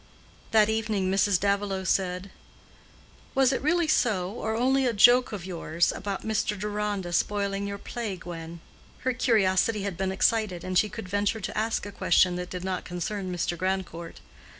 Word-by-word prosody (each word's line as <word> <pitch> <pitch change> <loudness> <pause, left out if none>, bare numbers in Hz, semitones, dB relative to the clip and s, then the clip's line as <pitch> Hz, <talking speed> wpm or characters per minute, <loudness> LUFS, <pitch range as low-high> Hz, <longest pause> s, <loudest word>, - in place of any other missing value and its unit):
That 215 -2 +5
evening 220 -4 0
Mrs. 195 -1 +3
Davilow 200 -1 0
said, 185 0 -1 1.0
"Was 270 0 +4
it - - -1
really 325 +3 +2
so, 200 -11 +1
or 220 0 -3
only 260 +3 +2
a 240 - +1
joke 245 +4 +6
of 200 -5 -6
yours, 170 -2 0
about 200 0 -5
Mr. 215 -1 0
Deronda's 205 -4 -1
spoiling 200 -1 -1
your 200 0 -4
play, 220 -1 -5
Gwen?" 170 -2 -8 0.4
Her 260 +1 0
curiosity 215 -3 +2
had 200 -4 -3
been 190 0 -1
excited, 195 -2 +1
and 185 0 -4
she 210 +3 +4
could 215 -2 -7
venture 205 +3 0
to - - -5
ask 220 0 -1
a 205 - -6
question 180 -1 +3
that 180 0 -5
did 180 -1 -6
not 185 -1 -2
concern 185 +2 -4
Mr. 175 -1 -1
Grandcourt. 185 -2 -3
200 Hz, 170 wpm, -27 LUFS, 185-220 Hz, 1.0 s, joke